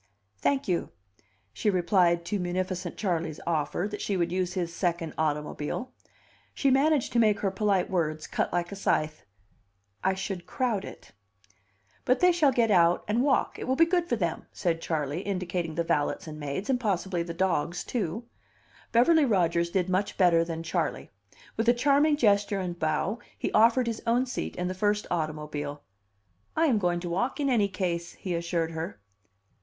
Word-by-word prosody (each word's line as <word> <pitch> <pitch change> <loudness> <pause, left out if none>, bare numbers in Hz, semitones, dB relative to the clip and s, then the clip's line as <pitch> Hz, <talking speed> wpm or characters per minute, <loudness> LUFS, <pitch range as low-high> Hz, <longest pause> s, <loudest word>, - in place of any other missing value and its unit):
"Thank 280 -1 +1
you," 175 -3 0 0.6
she 210 - 0
replied 175 -2 +2
to 205 +3 -1
munificent 180 0 -3
Charley's 170 -6 -2
offer 170 +3 -1
that 210 - -5
she 200 - -1
would 170 -1 0
use 180 -1 -1
his 170 -2 -2
second 170 -2 -1
automobile. 150 +9 -2 0.6
She 275 - +2
managed 280 +1 +2
to 240 - +3
make 215 -3 +3
her 195 - +1
polite 195 -2 +1
words 155 -4 -1
cut - - -1
like 175 +1 -1
a - - -5
scythe. 155 - 0 0.8
"I 190 0 +2
should 190 -2 -5
crowd 225 -3 -1
it." - - -11 0.9
"But 255 - +2
they 360 0 +6
shall 320 -5 +3
get 235 -3 +2
out 175 -2 +4
and 220 +3 +1
walk; 270 0 +1
it - - -5
will 260 - +2
be 330 - +6
good 345 0 0
for 240 - +2
them," 170 -7 -2
said 170 -4 -1
Charley, 150 0 -2
indicating 180 -4 -3
the 170 - 0
valets 145 -3 0
and 155 -1 -7
maids, 145 +7 -4
and 260 -2 +1
possibly 190 -5 -1
the 170 0 -5
dogs, 175 -1 0
too. 220 -1 -3 0.7
Beverly 295 +7 +5
Rodgers 170 -6 +2
did 180 0 0
much 190 +2 -1
better 170 -3 +5
than 165 -1 -5
Charley. 165 - -2 0.5
With 225 +1 +2
a 240 - +5
charming 290 +4 +3
gesture 205 -4 +2
and 175 -2 -4
bow, 160 +8 0 0.2
he - - -2
offered 235 +3 +4
his 230 -1 -3
own 240 +2 +3
seat 250 - -4
in 180 - -2
the 185 - -2
first 205 +2 0
automobile. 150 -3 -3 0.7
"I 325 - +3
am 250 -9 +3
going 175 -2 +1
to 175 - -4
walk 240 - -1
in 280 -1 +1
any 215 -5 +3
case," 175 -3 -3
he 185 - -5
assured 170 -1 -1
her. 160 -10 -5
185 Hz, 180 wpm, -28 LUFS, 170-225 Hz, 0.9 s, they